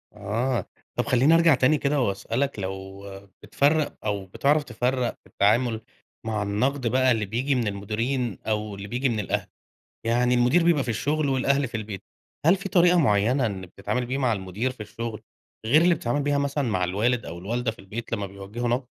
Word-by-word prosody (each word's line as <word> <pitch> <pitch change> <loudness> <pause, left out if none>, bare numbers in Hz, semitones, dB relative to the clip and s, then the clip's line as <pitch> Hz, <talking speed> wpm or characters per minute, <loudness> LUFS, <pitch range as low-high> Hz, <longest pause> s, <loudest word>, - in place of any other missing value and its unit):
آه، 115 +5 -1 0.3
طب - - 0
خلّيني 130 +6 +4
أرجع 165 -3 +6
تاني 130 +4 +3
كده 140 -1 +1
وأسأل 115 +3 -1
لك 140 -6 -1
لو 95 +1 -6 0.4
بتفرق 150 +2 +2
أو 100 -2 -1
بتعرف 145 +10 +1
تفرّق 125 0 -1
في - - -66
التعامل 110 +2 +2 0.4
مع 110 -2 -1
النقد 125 +6 0
بقى 130 +2 +3
اللي 110 -3 +1
بييجي 125 +7 0
من 120 -4 0
المديرين 110 +3 -2
أو 105 -1 -1
اللي 100 +1 -8
بييجي 125 +4 0
من 110 - -1
الأهل؟ 105 - -2 0.6
يعني 120 +2 +2
المدير 125 +8 +4
بيبقى 165 -5 +3
في 125 - -5
الشغل 145 +6 0
والأهل 135 +1 +2
في 115 - -4
البيت، 105 -3 -6 0.4
هل 170 - +6
في 195 +1 -6
طريقة 175 -1 +5
معيّنة 120 +1 +3
إنّك 95 -4 -4
بتتعامل 125 +7 -3
بيها 130 +3 -2
مع 125 -4 +2
المدير 100 +6 -3
في 125 - -11
الشغل 110 +1 -6 0.4
غير 150 +8 +5
اللي 175 -1 +4
بتتعامل 140 +2 -1
بيها 145 0 +1
مثلًا 140 0 0
مع 95 -4 0
الوالد 110 +7 0
أو 85 - -7
الوالدة 115 +5 -2
في - - -17
البيت 110 +5 -7
لمّا 105 -3 -1
بيوجّهوا 100 +5 -5
نقد؟ 125 +3 +1
120 Hz, 190 wpm, -25 LUFS, 105-140 Hz, 0.6 s, أرجع